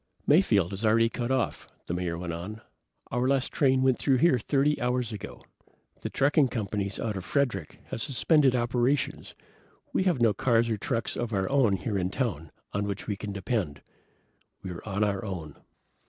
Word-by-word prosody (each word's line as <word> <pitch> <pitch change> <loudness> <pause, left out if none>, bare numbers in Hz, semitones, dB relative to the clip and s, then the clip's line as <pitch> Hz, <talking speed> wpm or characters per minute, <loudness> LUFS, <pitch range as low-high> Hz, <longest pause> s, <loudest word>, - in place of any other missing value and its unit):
"Mayfield 110 - +4
is 95 +3 -4
already 115 +1 +4
cut 120 0 -3
off," 130 -2 -1 0.2
the - - -3
Mayor 90 -1 -2
went 85 -1 -4
on. 100 +6 -6 0.5
"Our 125 +2 +1
last 135 -1 +1
train 130 -2 +3
went 130 -2 +3
through 135 -2 +3
here 135 -2 +4
30 145 +5 +1
hours 125 -1 0
ago. 105 -1 -8 0.6
The - - -3
trucking 140 +1 +3
companies 100 -4 -3
out 110 -3 -2
of 95 - -4
Frederick 125 - -1
have - - -4
suspended 140 +1 +3
operations. 125 +3 0 0.6
We 190 - +1
have 175 -8 +2
no 115 -3 +4
cars 115 +2 +2
or 110 - 0
trucks 115 +3 -2
of 120 -2 -3
our 95 -1 0
own 130 -7 +4
here 100 +2 -2
in 90 0 0
town, 90 - -3 0.2
on 100 +1 0
which 100 0 -4
we 105 - -2
can 105 +1 -6
depend. 100 - -2 0.8
We're 90 -3 -6
on 100 +1 0
our 100 -2 0
own. 85 -8 -6
115 Hz, 180 wpm, -28 LUFS, 100-130 Hz, 0.8 s, Mayfield